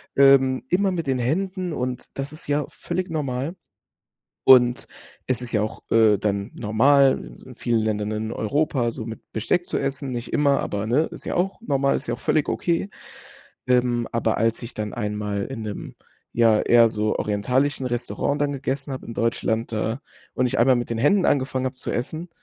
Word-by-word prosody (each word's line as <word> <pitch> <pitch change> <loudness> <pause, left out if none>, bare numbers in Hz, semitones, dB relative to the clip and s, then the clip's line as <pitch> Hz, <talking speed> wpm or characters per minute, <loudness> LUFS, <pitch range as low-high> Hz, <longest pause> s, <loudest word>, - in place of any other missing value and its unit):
ähm, 135 -1 +5
immer 195 +2 +2
mit 165 -5 -3
den 130 -2 +1
Händen 185 +7 -1
und 125 -1 -3
das 140 +2 -4
ist 155 - -9
ja 145 0 +1
völlig 180 +2 -4
normal. 145 0 -2 0.9
Und 125 -2 +6 0.4
es 130 -2 -1
ist 120 - -7
ja 105 - +2
auch, 110 - -4
äh, 110 -2 +5
dann 100 +1 -1
normal 135 +5 +4
in - - -11
s - - -16
vielen 120 -2 +1
Ländern 105 -1 -1
in 110 +1 -3
Europa 130 +1 0
so 110 - -6
mit 115 0 -9
Besteck 175 - 0
zu - - -2
essen, 135 -1 -2
nicht 120 0 -5
immer, 140 -2 +3
aber, 100 +1 -3
ne, 130 +7 +3
ist - - -7
ja - - -3
auch 195 +4 -1
normal, 140 -8 +1
ist - - -5
ja 120 - -1
auch - - -18
völlig 155 0 +1
okay. 170 +3 -1 0.8
Ähm, 125 -2 +2
aber 115 -1 0
als 115 +2 +1
ich 120 - -7
dann 105 -1 -4
einmal 105 -2 -2
in 130 -4 -6
'nem, 105 -2 -6 0.4
ja, 115 -2 +4
eher 120 -1 +5
so 105 0 -1
orientalischen 125 +6 0
Restaurant 125 +4 -2
dann 145 -1 +1
gegessen 135 +1 -3
habe 130 - -7
in 115 - -6
Deutschland 115 0 -1
da 110 +3 -2 0.4
und 125 - +2
ich 125 - 0
einmal 125 +2 +5
mit 120 0 -2
den 115 - -1
Händen 180 - +3
angefangen 130 -1 +1
habe 130 - -3
zu 130 - -5
essen, 155 +8 -4
125 Hz, 195 wpm, -23 LUFS, 115-145 Hz, 0.9 s, Und